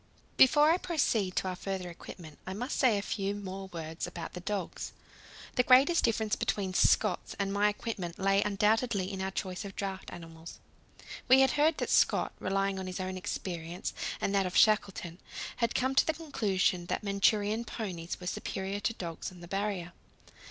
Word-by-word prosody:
Before 295 +4 +6
I 340 - +4
proceed 230 - 0
to - - 0
our 185 - -2
further 190 0 -4
equipment, 170 -2 -10
I 190 - -4
must 245 +6 -3
say 245 -6 +4
a 200 - -2
few 200 -1 -2
more 195 -1 -6
words 165 -2 -5
about 175 -1 -7
the 180 - -6
dogs. 190 -1 -4 0.6
The - - +7
greatest 265 +7 +5
difference 220 -2 +1
between 190 -3 -1
Scott's 195 0 +2
and 195 -1 -1
my 205 +1 +3
equipment 205 -5 -4
lay 195 +1 +3
undoubtedly 210 -1 +1
in 190 - -4
our 190 - -1
choice 185 -1 -4
of 195 -1 -8
draught 195 -1 -4
animals. 165 -1 -10 0.7
We 260 +1 +7
had 265 - +5
heard 300 +2 +3
that - - -2
Scott, - - +3
relying 195 0 0
on 190 - -5
his 185 0 -5
own 185 0 -3
experience, 180 -2 -4 0.3
and 195 - -1
that 195 -2 +2
of 180 - -2
Shackleton, 195 -5 +3 0.4
had 235 -1 0
come 260 +1 +1
to 270 - +5
the 320 - +1
conclusion 195 - 0
that - - -2
Manchurian 205 +2 +2
ponies 185 -7 -5
were 180 - -9
superior 195 +2 -3
to 230 - -1
dogs 170 -1 -5
on 180 -1 -14
the 175 - -9
Barrier. 195 -2 -2
195 Hz, 180 wpm, -31 LUFS, 185-220 Hz, 0.7 s, The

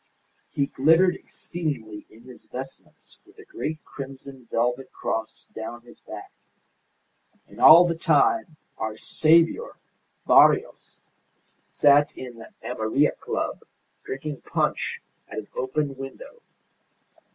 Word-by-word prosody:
He 140 - 0
glittered 165 +7 +4
exceedingly 140 -17 -6
in 115 +2 -18
his 125 0 -14
vestments 135 +2 -10
with - - -23
a 425 - -14
great 345 - -5
crimson 135 -2 -9
velvet 125 +3 -1
cross 110 0 -4
down 115 +2 -7
his 120 - -17
back. - - -10 1.2
And - - -12
all 170 +3 +10
the 170 - 0
time 335 - +2 0.2
our 110 0 -3
saviour 165 - +2 0.5
Barrios - - +4 0.7
sat 145 0 +4
in 125 -3 -9
the 115 - -11
Amarilla 125 +4 +1
Club - - -3 0.4
drinking 140 +1 -6
punch - - -2 0.2
at - - -9
an 110 -1 -5
open 135 +2 -2
window. 135 - -10
135 Hz, 115 wpm, -25 LUFS, 120-160 Hz, 1.2 s, all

